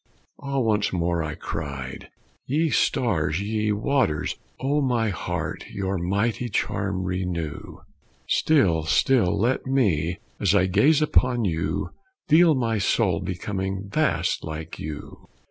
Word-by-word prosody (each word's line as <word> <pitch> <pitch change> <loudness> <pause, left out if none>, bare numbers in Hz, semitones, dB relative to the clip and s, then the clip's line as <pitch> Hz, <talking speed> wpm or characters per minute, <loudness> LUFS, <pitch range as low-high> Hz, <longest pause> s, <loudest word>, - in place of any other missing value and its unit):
"Ah, 140 -1 -3
once 110 -5 +1
more," 85 -1 0
I 75 -1 -4
cried, 70 -5 -6 0.4
"ye 155 +4 +1
stars, 90 - +1
ye 105 +1 -1
waters, 105 - 0 0.2
On 145 +2 +1
my 120 -4 +1
heart 95 - -4
your 95 -1 -2
mighty 100 +7 -1
charm 95 -1 -1
renew; 90 -4 -4 0.5
Still, 100 - +3
still 95 +4 +3
let 125 +5 0
me, 90 - +1 0.2
as 100 -1 +2
I 95 -2 +4
gaze 140 - +4
upon 125 -5 +2
you, 80 -3 -1 0.4
Feel 165 0 +6
my 115 -4 0
soul 95 -3 +2
becoming 95 +1 -4
vast - - +1
like 80 +1 -6
you!" 75 -1 -8
100 Hz, 125 wpm, -24 LUFS, 85-125 Hz, 0.5 s, Feel